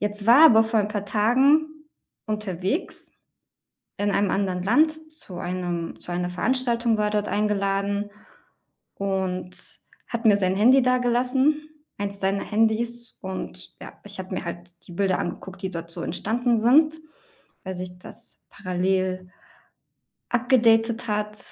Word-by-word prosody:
Jetzt 205 0 -1
war 240 +5 +7
er - - +10
aber 225 -3 +6
vor 225 0 +1
ein 205 - -1
paar 205 -1 -4
Tagen 280 +9 +2 0.4
unterwegs 210 - -3 0.9
in 205 0 -1
einem 200 -1 +1
anderen 185 -2 -1
Land 295 +11 +4 0.2
zu 255 - -10
einem 175 -2 -4
zu - - -7
einer 180 0 -2
Veranstaltung 235 +2 +1
war 210 - +1
er 210 - -1
dort 210 - -8
eingeladen 200 0 -1 0.9
und 190 -2 -3 0.3
hat 235 0 -5
mir 210 -2 +7
sein 190 -2 +1
Handy 250 +7 +5
dagelassen 255 +4 +1 0.3
1 200 0 -2
seiner 195 +1 0
Handys. 225 +2 -1
Und, 190 -1 -7
ja, - - -10
ich 205 0 -7
habe 190 0 -6
mir - - -3
halt 175 +1 -7 0.2
die 175 - -10
Bilder 190 0 +1
angeguckt, 190 +2 -6
die 190 - -3
dort 170 -2 -7
so 170 - -6
entstanden 230 +7 0
sind, 300 +7 +4 0.7
weil 190 0 -5
sich 180 0 -7
das - - -11
parallel 185 0 -2 1.0
upgedatet 235 -2 +3
hat 210 0 -2
205 Hz, 140 wpm, -24 LUFS, 185-235 Hz, 1.0 s, er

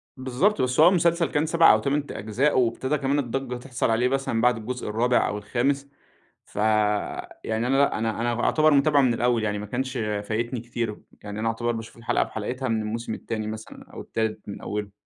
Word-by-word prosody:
بالضبط، 130 +11 +1
بس 125 +1 0
هو 160 - +9
المسلسل 170 -2 +2
كان 150 +2 +1
7 165 +1 +6
أو - - +3
8 145 +1 0
ت - - -9
أجزاء، 125 +7 +1
وابتدى 130 +4 0
كمان 140 +1 0
الضجّة 130 -1 -3
تحصَل 125 0 -2
عليه 115 +2 +2
مثلًا 135 -3 0
بعد 125 0 +3
الجزء 120 +2 -5
الرابع 120 +3 +2
أو 105 - -3
الخامس، 135 +7 -1 0.6
فيعني 105 +1 -1
أنا 135 +2 +2
لأ 140 -5 +3
أنا 110 0 -2
أنا 120 0 0
أُعتبر 155 0 +4
متابعُه 145 +1 +4
من 125 -3 +3
الأول، 120 -1 +1
يعني 105 -1 -1
ما 105 - -6
كانش 130 +3 -3
فايتني 110 +3 -2
كتير 115 -2 -4 0.2
يعني 105 +1 -6
أنا 115 - 0
أُعتبر 120 +1 -1
باشوف 115 0 -7
الحلقة 115 0 0
بحلقتها 125 +5 -3
من 110 -1 0
الموسم 110 +1 -3
التاني 110 -1 -4
مثلًا 110 0 -8
أو - - -8
التالت 110 -2 -3
من 100 - -7
أولُه. 105 -1 -4
120 Hz, 195 wpm, -25 LUFS, 110-135 Hz, 0.6 s, هو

